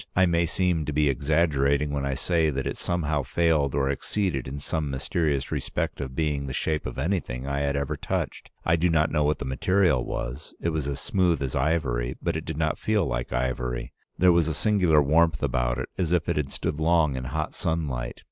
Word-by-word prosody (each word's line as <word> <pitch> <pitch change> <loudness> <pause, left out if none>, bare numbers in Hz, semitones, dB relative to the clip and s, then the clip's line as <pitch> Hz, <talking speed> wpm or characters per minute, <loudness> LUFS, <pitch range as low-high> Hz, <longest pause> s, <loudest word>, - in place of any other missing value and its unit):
I 95 - +5
may 85 -1 +2
seem 85 -1 +1
to 75 - -2
be 75 0 +2
exaggerating 70 0 +2
when 70 -1 -1
I 70 - -1
say 80 +2 +1
that 65 -2 -2
it - - -2
somehow 80 -4 -1
failed 75 +1 +1
or 70 -2 +1
exceeded 70 +1 -1
in 70 +2 -5
some 75 +1 -2
mysterious 70 +1 -1
respect - - -2
of 65 -2 -5
being 75 -3 -1
the 65 - -4
shape 80 -3 -1
of 65 - -7
anything 65 -5 -2
I 70 0 -1
had 70 0 0
ever 70 -1 -1
touched. - - -3 0.2
I 85 0 +3
do 85 +2 +2
not 80 -1 +2
know 75 -1 +2
what 75 0 +2
the 70 - -5
material 80 +2 +2
was. - - -5
It 85 - -1
was 80 -4 -2
as 70 -1 -3
smooth 90 -4 +1
as 65 - -3
ivory, 65 -5 0
but - - -1
it 80 - -3
did 80 - -4
not 80 -1 0
feel 110 -2 +1
like - - -3
ivory; 60 -1 -2 0.2
there 90 0 +6
was 85 -2 +3
a 80 - -1
singular 90 -7 +3
warmth 80 0 +3
about - - 0
it, 65 - -4
as 85 -3 0
if 90 -2 +1
it 85 - +1
had 75 -2 -1
stood 75 - -3
long 80 -3 +3
in 65 -1 -4
hot 75 +3 -3
sunlight. 70 -7 -2
75 Hz, 215 wpm, -26 LUFS, 70-85 Hz, 0.2 s, there